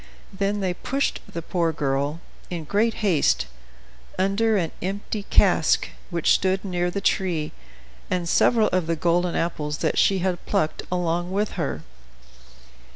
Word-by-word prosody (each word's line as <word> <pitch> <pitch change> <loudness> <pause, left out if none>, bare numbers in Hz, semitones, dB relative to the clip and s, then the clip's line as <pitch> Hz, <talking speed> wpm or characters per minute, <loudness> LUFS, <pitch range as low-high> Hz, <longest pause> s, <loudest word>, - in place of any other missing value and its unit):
Then 200 +1 -1
they 185 -2 0
pushed 275 +9 -1
the 170 - -5
poor 170 -1 0
girl, 145 +1 -1 0.3
in 170 -3 -4
great 210 +8 +1
haste, 155 - +3 0.7
under 200 +4 +2
an 170 -4 -1
empty 200 +2 -4
cask, - - +3 0.2
which 170 -3 +1
stood 190 +1 +2
near 180 -2 0
the 200 +3 -3
tree, 175 -6 0 0.6
and 180 -2 -1
several 225 +4 +4
of 185 -3 0
the 165 - +1
golden 175 +2 +1
apples 150 -3 -1
that - - +1
she 195 - +4
had 180 -1 -1
plucked 155 - 0
along 175 0 0
with 205 +2 0
her. 135 - -3
180 Hz, 145 wpm, -24 LUFS, 165-195 Hz, 0.7 s, several